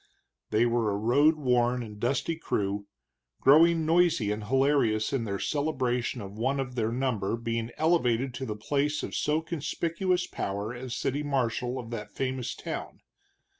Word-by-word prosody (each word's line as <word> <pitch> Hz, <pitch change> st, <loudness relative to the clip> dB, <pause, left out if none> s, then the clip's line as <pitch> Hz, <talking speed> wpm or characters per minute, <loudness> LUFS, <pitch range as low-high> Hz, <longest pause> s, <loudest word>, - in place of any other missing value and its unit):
They 110 Hz, +3 st, +3 dB
were 120 Hz, -2 st, +1 dB
a 100 Hz, -, 0 dB
road 140 Hz, +9 st, +4 dB
worn 125 Hz, -3 st, +1 dB
and 105 Hz, -2 st, -10 dB
dusty 135 Hz, +8 st, 0 dB
crew, 100 Hz, -9 st, -2 dB, 0.5 s
growing 160 Hz, +3 st, +5 dB
noisy 165 Hz, -10 st, +3 dB
and 105 Hz, 0 st, -3 dB
hilarious 130 Hz, -3 st, +2 dB
in 125 Hz, -4 st, 0 dB
their 100 Hz, -2 st, -2 dB
celebration 130 Hz, -3 st, -1 dB
of 100 Hz, +1 st, -9 dB
one 135 Hz, +4 st, +1 dB
of 130 Hz, -2 st, -3 dB
their 115 Hz, -2 st, 0 dB
number 115 Hz, -4 st, -1 dB
being 115 Hz, 0 st, -2 dB
elevated 135 Hz, -6 st, +2 dB
to 130 Hz, +2 st, -5 dB
the 105 Hz, -, -3 dB
place 145 Hz, +7 st, -1 dB
of -, -, -5 dB
so 150 Hz, +1 st, +1 dB
conspicuous 170 Hz, +3 st, -1 dB
power 100 Hz, +4 st, -4 dB
as 125 Hz, 0 st, -5 dB
city 140 Hz, +2 st, -1 dB
marshal 125 Hz, -3 st, -1 dB
of 120 Hz, -2 st, -7 dB
that 105 Hz, -3 st, -5 dB
famous 130 Hz, +2 st, -3 dB
town. -, -, -6 dB
125 Hz, 160 wpm, -28 LUFS, 115-145 Hz, 0.5 s, growing